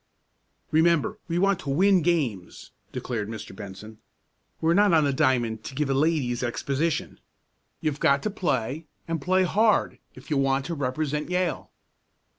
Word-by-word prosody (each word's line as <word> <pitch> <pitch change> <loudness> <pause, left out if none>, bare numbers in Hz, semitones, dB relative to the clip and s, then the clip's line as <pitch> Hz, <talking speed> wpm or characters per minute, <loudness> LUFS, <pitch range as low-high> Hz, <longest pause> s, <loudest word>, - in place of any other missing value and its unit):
"Remember 170 +5 +2
we 170 -1 -1
want 195 0 +2
to 140 - -6
win 185 +6 +4
games," 140 - -2 0.2
declared 110 -4 -4
Mr. 110 -2 -8
Benson. 105 +1 -10 0.6
"We're 165 +1 +2
not 200 0 +4
on 160 -2 +5
the 140 -1 +1
diamond 120 -6 +1
to 130 - -7
give 145 -1 0
a - - +3
ladies' 135 -4 +1
exhibition. 140 +5 -2 0.6
You've 150 -2 -1
got 140 -4 +3
to 215 - -1
play, 155 - -2 0.2
and 165 -2 -2
play 185 +4 +2
hard 210 +4 +2 0.2
if - - -13
you 145 - +2
want 135 0 +1
to 170 - -3
represent 150 +2 -2
Yale." 180 -1 -1
150 Hz, 155 wpm, -26 LUFS, 130-170 Hz, 0.6 s, on